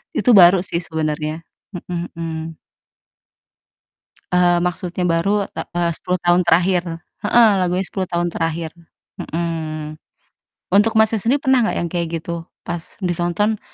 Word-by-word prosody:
Itu 250 - +3
baru 185 -2 +8
sih 170 -2 -2
sebenarnya, 155 -1 -3 0.3
mhm 175 0 -4
mhm. 165 -1 -5 1.8
Eee, 175 -1 +4
maksudnya 180 0 -4
baru, 165 +3 +1 0.3
ta - - -2
eee, 175 -1 +1
10 180 +2 -2
tahun 175 +1 +3
terakhir, 175 +1 +3 0.4
heeh, 230 +2 +5
lagunya 180 +1 0
10 190 -2 -3
tahun 175 0 0
terakhir, 165 0 -2 0.5
mhm. 155 -2 -4 0.8
Untuk 215 +3 +4
Masnya 220 0 +3
sendiri 245 +7 +2
pernah 265 -1 +4
gak - - -2
yang 170 - -2
kayak 170 -2 -1
gitu? 170 +1 -6 0.2
Pas 170 -1 -3 0.2
ditonton, 175 +5 0
175 Hz, 130 wpm, -20 LUFS, 165-185 Hz, 1.8 s, baru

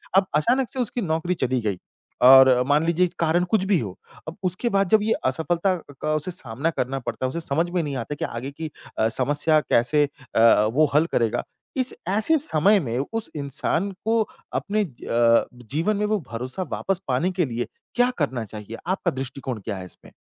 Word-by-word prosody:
अब 195 0 +5
अचानक 245 - +2
से 265 - -4
उसकी 245 0 -1
नौकरी 165 -1 -1
चली 130 -1 +1
गई, 105 -4 -1 0.4
और 130 0 +8
मान 150 +3 +3
लीजिए 170 +2 +2
कि 175 - -16
कारण 170 +2 +2
कुछ 215 -4 +3
भी 190 -3 +3
हो। 100 -7 -6 0.3
अब 160 - -7
उसके 185 +6 0
बाद 195 -3 +1
जब 215 +2 +5
ये 220 +1 +2
असफ़लता 170 +7 +1 0.3
का 155 - 0
उसे 155 +4 -1
सामना 140 -2 -2
करना 135 -4 -2
पड़ता 130 - -4
है, - - 0
उसे 165 - -4
समझ 165 +2 0
में 175 -1 0
नहीं 145 -2 -4
आता 130 +5 -4
कि - - -3
आगे 125 +4 -5
की 155 +2 -6 0.3
अ, 110 - +3
समस्या 145 +6 +2
कैसे 145 +2 +2 0.3
अ, 115 -2 +6
वो 155 +4 +4
हल 155 +2 +5
करेगा। 115 -2 +1 0.3
इस 255 -1 0 0.2
ऐसे 220 +11 +3
समय 200 - +3
में 115 0 -2 0.2
उस 225 -1 -3
इंसान 150 +6 -1
को 225 0 +3 0.3
अपने 210 +1 0
अ, 120 - +2 0.3
जीवन 170 +9 +1
में 210 - 0
वो 210 0 +1
भरोसा 130 +10 -4
वापस 190 -1 -1
पाने 135 +8 +1
के 175 -2 0
लिए 120 -2 -3 0.3
क्या 245 0 +4
करना 130 -7 -1
चाहिए? 105 +1 -8
आपका 185 -1 0
दृष्टिकोण 130 -2 -5
क्या 105 -4 -3
है 95 - -7
इसमें? 90 - -11
155 Hz, 200 wpm, -24 LUFS, 130-190 Hz, 0.4 s, और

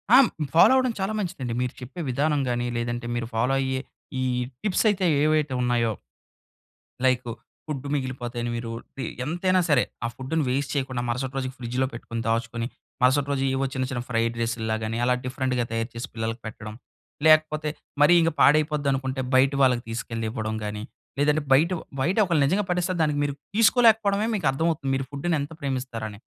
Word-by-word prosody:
ఆ! - - +10
హ్మ్, 230 - +1 0.3
ఫాలో 170 - +8
అవ్వడం 255 -1 +3
చాలా 195 +3 -1
మంచిదండి. 155 - -3
మీరు 125 - -2
చెప్పే 130 +8 -7
విధానం 145 +3 +1
గాని, 120 0 -1
లేదంటే 120 +1 -3
మీరు 120 -1 -2
ఫాలో 125 +4 +2
అయ్యే 130 0 -1 0.4
ఈ - - +1 0.4
టిప్సయితే 205 -1 +2 0.2
ఏవైతే 155 -2 +2
ఉన్నాయో... 120 -2 +1 1.1
లైకు 125 -2 +2 0.4
ఫుడ్ 145 -3 -4
మిగిలిపోతే 130 -3 -4
అని 120 - -2
మీరు 115 -1 -4 0.3
టి 135 - -3 0.2
ఎంతైనా 185 +4 +1
సరే! 140 -5 +4 0.2
ఆ - - +2
ఫుడ్‌ని 140 +5 -2
వేస్ట్ 135 +1 -1
చేయకుండా 130 -3 -1
మరుసటి 130 +3 -2
రోజుకి 130 -1 -3
ఫ్రిడ్జ్‌లో 125 +2 -1
పెట్టుకొని, 115 -1 -5
దాచుకొని 115 0 -1 0.4
మరుసటి 135 +3 +3
రోజు 135 - 0
ఏవో 135 +1 0
చిన్న 130 0 0
చిన్న 125 -2 -2
ఫ్రైడ్ 115 0 0
రైసులాగని 115 -1 -2
అలా 125 0 +3
డిఫరెంట్‌గా 130 -1 -1
తయారు 115 +1 -2
చేసి 120 +5 -5
పిల్లలకి 115 +1 -3
పెట్టడం. 105 -1 -7 0.5
లేకపోతే 155 -1 +4 0.3
మరీ 150 +4 +7
ఇంక 165 - +3
పాడైపోద్ది 150 0 +4
అనుకుంటే 130 0 -2
బయట 135 +2 +5
వాళ్ళకి 125 -2 +3
తీసుకెళ్లి 115 -1 -3
ఇవ్వడం 110 -2 -3
గాని, 105 0 -4 0.4
లేదంటే 150 +1 +3
బయటొ 165 +7 +4 0.2
బయటొకళ్ళు 175 0 +2
నిజంగా 200 +7 +1
పడేస్తే 180 +1 0
దానికి 150 -2 +1
మీరు 140 -1 -2 0.2
తీసుకోలేకపోవడమే 220 -2 +4
మీకర్థమవుతుంది. 155 -2 0
మీరు 135 0 -3
ఫుడ్‌ని 155 +4 -1
ఎంత 145 +3 -7
ప్రేమిస్తారు 130 -5 -3
అని 100 +1 -12
130 Hz, 165 wpm, -25 LUFS, 120-155 Hz, 1.1 s, ఆ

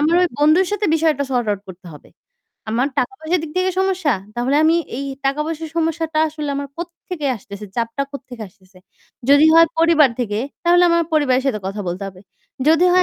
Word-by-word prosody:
আমার 310 +3 +2
ওই 360 - +2
বন্ধুর 310 +6 +4
সাথে 415 0 0
বিষয়টা 315 -3 +1
সর্ট 245 -3 0
আউট 200 -2 -2
করতে 185 0 -12
হবে। 150 - -15 0.6
আমার 245 +5 +1
টাকা 255 - 0
পয়সার 325 +3 0
দিক 320 - -6
থেকে 370 0 +1
সমস্যা? 370 -7 +1 0.2
তাহলে 250 +4 +1
আমি 325 +2 +4 0.2
এই 275 +2 -4 0.2
টাকা 275 +2 0
পয়সার 320 -1 -5
সমস্যাটা 325 -1 -1
আসলে 300 -1 -6
আমার 280 0 -4
কোত্থেকে 340 -2 -6
আসতেছে? 200 0 -10
চাপটা 235 +3 -1
কোত্থেকে 250 -4 -9
আসতেছে। 185 -1 -23 0.5
যদি 285 +2 +7
হয় 330 0 +7
পরিবার 325 -4 +5
থেকে, 210 -3 -2 0.3
তাহলে 350 +1 +5
আমার 335 0 +3
পরিবারের 270 -4 +2
সাথে 225 -6 0
কথা 195 +2 -4
বলতে 180 +3 -4
হবে। 185 -1 -13 0.5
যদি 325 +2 +5
হয় 365 - +5
295 Hz, 190 wpm, -19 LUFS, 240-330 Hz, 0.6 s, যদি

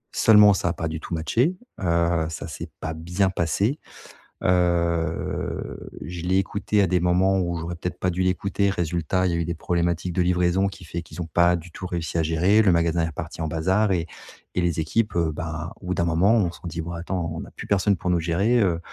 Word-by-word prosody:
Seulement, 105 -2 +7
ça 90 - 0
a - - -1
pas 80 - -3
du 80 0 -4
tout 85 - -5
matché 120 - +1 0.2
heu, 85 -2 +1
ça 80 - -6
s'est - - -7
pas 80 - -4
bien 90 +4 0
passé. 100 - 0 0.6
Heu, 85 -2 0
je 85 0 -6
l'ai 90 +2 +1
écoutée 100 +2 0
à - - +4
des 90 +1 +2
moments 90 +2 +3
où 85 -2 -1
j'aurais 85 +1 -4
peut-être 90 +1 -5
pas 90 - 0
dû 90 +2 -2
l'écouter. 100 +2 +1
Résultat, 90 0 0
il 90 - +1
y - - -1
a 85 - 0
eu 85 - -1
des 85 0 -3
problématiques 85 +1 -1
de 90 - +1
livraison 90 +2 +2
qui 95 -1 -8
fait 85 +1 -4
qu'ils 85 +1 -7
ont - - -6
pas 85 +2 +3
du 85 0 -8
tout 90 +2 -6
réussi 85 -2 -2
à - - +2
gérer. 90 +7 +3
Le 100 -4 +4
magasin 85 0 +2
est - - -5
parti 80 - -7
en 80 - -1
bazar 95 +6 +1
et 85 -3 +1 0.5
et 90 - 0
les 85 -2 0
équipes, 105 +8 0
heu, 85 -2 +1
ben, 80 +1 -5
au 90 - -9
bout 90 - 0
d'un 85 - +1
moment, 85 +6 +3
ont 95 -7 +2
se 85 - -14
sont - - -7
dit: 85 0 -4
«Bon 85 - -6
attends 85 0 -3
on 80 - -5
a - - -14
plus - - -9
personne 100 0 +2
pour 90 - -3
nous 85 - +2
gérer, 95 +9 +2
heu, 90 -6 +2
85 Hz, 240 wpm, -24 LUFS, 85-95 Hz, 0.6 s, Seulement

